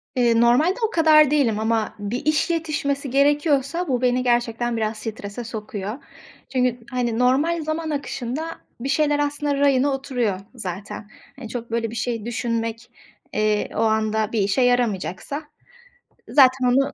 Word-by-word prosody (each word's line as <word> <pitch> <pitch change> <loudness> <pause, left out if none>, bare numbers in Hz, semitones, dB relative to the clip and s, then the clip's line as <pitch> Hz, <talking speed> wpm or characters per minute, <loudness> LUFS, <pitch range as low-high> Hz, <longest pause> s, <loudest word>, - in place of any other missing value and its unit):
Eee, 235 -2 +3
normalde 285 - +3
o - - -11
kadar 310 - +5
değilim 250 -8 +2
ama 220 0 0
bir 230 +7 -4
iş 310 +2 +2
yetişmesi 295 -4 -1
gerekiyorsa 290 +4 +2
bu 250 -3 0
beni 250 0 +2
gerçekten 240 -1 0
biraz 215 0 -1
strese 215 0 -6
sokuyor. 215 +1 -6 0.5
Çünkü 250 -2 0
hani 245 -3 -1
normal 290 +7 +2
zaman 315 +1 -3
akışında 280 -1 -3 0.3
bir 265 +3 -4
şeyler 295 0 +2
aslında 290 0 -1
rayına 280 0 +3
oturuyor 250 -8 -1 0.2
zaten. 200 0 -6 0.3
Hani 255 -5 -9
çok 235 0 -6
böyle 230 0 -1
bir - - -8
şey 230 -1 -3
düşünmek, 230 0 -3 0.4
eee, 215 0 +1
o - - -2
anda 220 -1 +1
bir 225 - 0
işe 200 +5 +1
yaramayacaksa 245 - 0 0.8
zaten 260 -2 +5
onu 270 +2 +2
245 Hz, 145 wpm, -22 LUFS, 225-285 Hz, 0.8 s, kadar